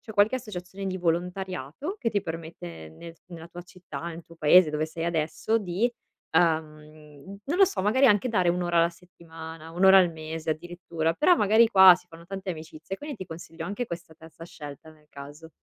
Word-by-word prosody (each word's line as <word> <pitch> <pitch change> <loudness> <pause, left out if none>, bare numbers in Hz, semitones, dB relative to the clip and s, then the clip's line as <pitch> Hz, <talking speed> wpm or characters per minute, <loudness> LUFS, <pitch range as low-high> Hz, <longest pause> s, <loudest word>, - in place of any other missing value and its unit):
c'è 220 -3 -11
qualche 210 +5 +4
associazione 195 -4 -7
di 185 0 -2
volontariato 180 - -3
che 230 - 0
ti 205 -3 -1
permette 160 - -8
nel 165 - -11
nella 170 -2 -10
tua 175 +1 -9
città, 175 -5 -10
nel 170 0 -8
tuo 170 - -16
paese, 160 +1 +6
dove 155 +1 -1
sei 165 +1 -5
adesso, 170 +7 0
di, 205 +5 -1 0.4
uhm, 155 0 -2
non 335 +7 -2
lo 390 - +8
so, 190 - -3
magari 255 +7 +4
anche 215 +2 +3
dare 185 -5 +2
un'ora 175 -1 +1
alla 170 - +5
settimana, 165 -2 -12
un'ora 190 +2 +7
al 180 -2 +4
mese 160 0 -7
addirittura. 165 0 -3
Però, 305 - +4
magari 220 +3 +5
qua 190 -4 +9
si 180 - -19
fanno 170 -1 -14
tante 195 +1 -7
amicizie, 160 +2 -7
quindi 295 +3 -7
ti 190 - -8
consiglio 165 0 -8
anche 205 +5 -3
questa 170 -4 -8
terza 160 +1 -15
scelta 145 -1 -10
nel 155 -1 -22
caso. 145 +3 -11
170 Hz, 190 wpm, -26 LUFS, 160-195 Hz, 0.4 s, qua